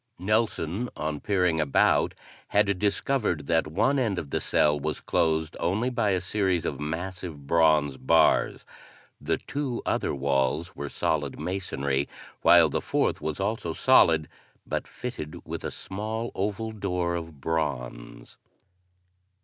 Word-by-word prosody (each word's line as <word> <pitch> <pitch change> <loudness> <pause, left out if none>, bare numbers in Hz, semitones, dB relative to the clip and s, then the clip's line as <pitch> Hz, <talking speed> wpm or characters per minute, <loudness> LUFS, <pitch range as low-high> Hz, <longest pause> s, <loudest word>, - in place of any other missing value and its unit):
Nelson, 105 +1 0
on 75 -1 -2
peering 90 -5 +1
about, 70 -3 +3 0.3
had 100 -2 +2
discovered 105 - 0
that 80 -2 +2
one 120 - +2
end 110 -7 0
of 75 -5 -5
the - - 0
cell 75 -1 +2
was 75 +2 -2
closed 80 0 0
only 110 +9 0
by 115 -4 +1
a 95 -2 +2
series 95 -1 0
of - - -3
massive 80 -1 -5
bronze 75 -3 +3
bars; 80 +6 +3 0.6
the - - 0
two 135 -4 -4
other - - 0
walls 70 +4 0
were 70 0 -5
solid 75 -2 -1
masonry; 70 -7 -2 0.3
while - - +7
the - - -2
fourth - - 0
was 80 -1 -3
also 100 -4 -2
solid 80 -1 +5 0.4
but - - -3
fitted 80 -12 -7
with - - -5
a - - -2
small 110 +4 -4
oval 105 +3 -2
door 90 -5 -2
of 80 -4 -6
bronze. 60 -6 -4
85 Hz, 135 wpm, -27 LUFS, 75-100 Hz, 0.6 s, while